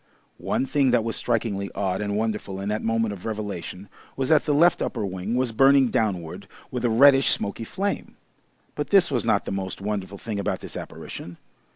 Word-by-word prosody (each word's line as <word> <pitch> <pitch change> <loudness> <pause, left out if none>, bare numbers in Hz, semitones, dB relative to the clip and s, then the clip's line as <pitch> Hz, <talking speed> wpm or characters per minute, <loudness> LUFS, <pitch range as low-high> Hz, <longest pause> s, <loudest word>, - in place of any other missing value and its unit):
One - - -1
thing 135 0 +2
that 120 -2 +3
was 115 0 -2
strikingly 110 -4 -1
odd 95 -1 -1
and 100 0 -1
wonderful 105 -3 -2
in 100 +1 -3
that 105 +1 -1
moment 115 -1 0
of 95 - -10
revelation 100 -3 -5 0.3
was 135 +1 -1
that 155 -2 +4
the - - +1
left 170 +4 +4
upper 110 -4 -2
wing 95 +4 -3
was 125 -1 +1
burning 135 +2 +5
downward 90 -7 -2 0.2
with 125 -1 -3
a 120 - +3
reddish, 135 +4 +6
smoky 100 +3 0
flame. 200 - -3 0.6
But - - -4
this 195 -6 +5
was 125 -4 0
not 110 -3 +2
the - - -4
most 95 -1 -4
wonderful 100 -1 -4
thing 105 0 -4
about 100 - -2
this - - -8
apparition. 85 -1 -8
110 Hz, 195 wpm, -24 LUFS, 100-125 Hz, 0.6 s, reddish